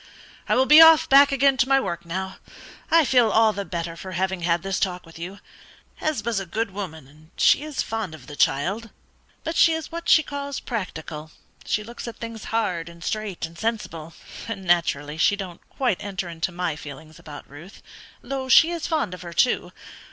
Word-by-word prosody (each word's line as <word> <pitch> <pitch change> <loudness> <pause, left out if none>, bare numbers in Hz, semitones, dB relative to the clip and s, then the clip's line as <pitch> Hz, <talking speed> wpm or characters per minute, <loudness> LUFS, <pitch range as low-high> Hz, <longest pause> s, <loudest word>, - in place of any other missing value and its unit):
I - - +3
will 260 - +4
be 300 +3 +9
off 325 -1 +8
back 280 +1 +7
again 275 0 +3
to 265 - +2
my 270 0 +5
work 170 -9 -4
now; 190 +2 -4 0.5
I 330 -2 +5
feel 245 -3 +4
all 220 0 +4
the 200 - -4
better 170 -1 -5
for 185 +2 -8
having 190 0 -1
had 170 0 0
this 195 -1 -2
talk 180 -2 -2
with 165 0 -14
you. 180 +4 -7 0.6
Hesba's 235 -8 -1
a 195 - -6
good 220 +4 -2
woman, 170 -8 -7
and 155 +3 -20
she - - +4
is 300 -2 -3
fond 220 -7 -4
of 135 -5 -15
the 145 - -10
child; 195 +13 0 0.5
but 325 +1 -3
she 330 - +5
is 320 +1 -5
what 335 +1 -5
she 315 - +6
calls 280 -1 -5
practical 160 -8 -6 0.4
she 210 - -1
looks 235 +2 -9
at 235 - -7
things 230 -2 -7
hard, 180 -7 -1
and 170 0 -13
straight, 215 -5 -3
and 165 +1 -12
sensible, 170 -8 -4 0.3
and 205 -4 -5
naturally 160 -3 +1
she 205 - +4
don't 185 -4 -8
quite 245 -9 -1
enter 195 -3 -4
into 165 +1 -3
my 175 -3 -2
feelings 150 +1 -11
about 145 -1 -11
Ruth, 160 +8 -13 0.4
though 265 +1 -4
she 325 +7 +7
is 340 -2 -3
fond 305 - -1
of 180 - -9
her 170 -1 -8
too. 245 - +1
195 Hz, 200 wpm, -24 LUFS, 170-250 Hz, 0.6 s, be